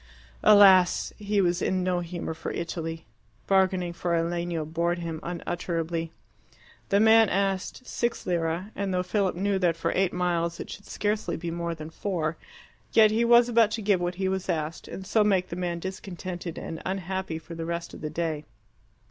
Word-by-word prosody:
Alas! 190 -4 +6
he 205 -1 +1
was 175 -1 +1
in 185 -1 0
no 180 -1 +1
humour 170 -1 -4
for 165 +1 -6
Italy. 165 -1 -4 0.4
Bargaining 185 -2 +2
for 170 0 -1
a 165 - +2
legno 170 -1 -2
bored 170 +2 0
him 165 -2 -4
unutterably. 170 -1 -3 0.8
The 200 - +4
man 220 0 +6
asked 195 +5 -1
six 235 -1 -2
lire; 170 +3 -1
and 200 -1 -2
though 180 0 +1
Philip 190 0 0
knew 195 +2 0
that 170 -3 +2
for 165 0 -1
eight 190 -1 +2
miles 170 -1 -1
it - - -6
should 200 - -10
scarcely 205 -4 -1
be 170 0 -4
more 170 0 -3
than 155 0 -8
four, 165 -3 -2 0.6
yet 215 -1 +7
he 225 +2 +2
was 235 0 +6
about 230 -3 +4
to 220 - -6
give 200 -3 +2
what 175 0 -1
he 190 +1 -1
was 190 0 -2
asked, 160 -1 -2
and 190 - -7
so 215 +2 +3
make 190 -3 +2
the - - -4
man 175 -1 -2
discontented 185 -1 -6
and 160 - -6
unhappy 190 -2 -3
for 160 +1 -10
the 165 0 -5
rest 170 0 -4
of - - -10
the 155 - -3
day. 155 -1 -2
180 Hz, 185 wpm, -27 LUFS, 170-195 Hz, 0.8 s, yet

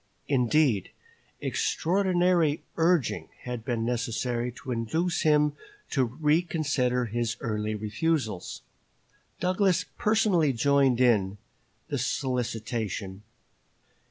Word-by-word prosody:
Indeed, 125 - +2 0.5
extraordinary 175 -3 +1
urging 165 -5 +1
had 125 -2 -5
been 115 -1 -1
necessary 120 0 -1
to 130 +1 -8
induce 160 +10 -1
him 150 -1 +3 0.4
to 135 - +2
reconsider 150 -2 +1
his 115 0 -2
early 105 -1 -2
refusals. 110 - -2 0.8
Douglas 185 0 +2
personally 200 -9 +3
joined 135 0 +3
in 105 -6 +3 0.5
the - - -1
solicitation. 115 -6 -2
130 Hz, 85 wpm, -27 LUFS, 115-160 Hz, 0.8 s, him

